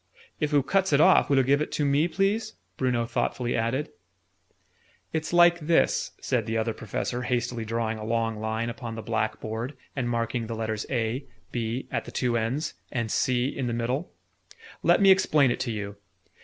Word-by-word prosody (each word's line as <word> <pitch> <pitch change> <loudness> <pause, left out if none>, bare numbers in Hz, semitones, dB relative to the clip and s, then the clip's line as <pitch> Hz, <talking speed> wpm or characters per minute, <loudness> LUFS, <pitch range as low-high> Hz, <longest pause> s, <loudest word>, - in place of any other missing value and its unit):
"If 150 -1 0
oo 145 -2 +4
cuts 190 +4 +1
it 140 - +5
off, - - +6
will 140 - +4
oo 135 - +5
give 140 +3 +3
it - - -2
to 150 - 0
me, 140 +4 +3
please? 205 +5 0 0.2
Bruno 125 -3 0
thoughtfully 120 +1 -1
added. 115 +6 -1 1.2
"It's 160 0 -2
like 175 0 +6
this," 165 +1 +2
said 120 -4 -1
the 115 0 0
Other 110 0 0
Professor, 115 +4 -3
hastily 120 -2 -1
drawing 115 0 -2
a - - -6
long 115 0 -1
line 110 +2 -2
upon 115 -2 -6
the 115 - -6
black 110 0 -1
board, 115 +5 -5 0.2
and 125 -3 -1
marking 115 0 -1
the 115 - -4
letters 110 -1 -3
'A,' 120 +1 -1 0.3
'B,' 120 +2 -3
at - - -2
the - - -8
two 125 -2 0
ends, 125 +8 -1 0.2
and 115 -4 -2
'C' 125 -1 +1
in 130 -3 -2
the 120 - -1
middle: 125 +8 -2 0.7
"let - - +4
me 195 - +8
explain 150 -8 +4
it 120 - -2
to 130 -2 -2
you. 100 -2 -5
120 Hz, 190 wpm, -27 LUFS, 115-145 Hz, 1.2 s, me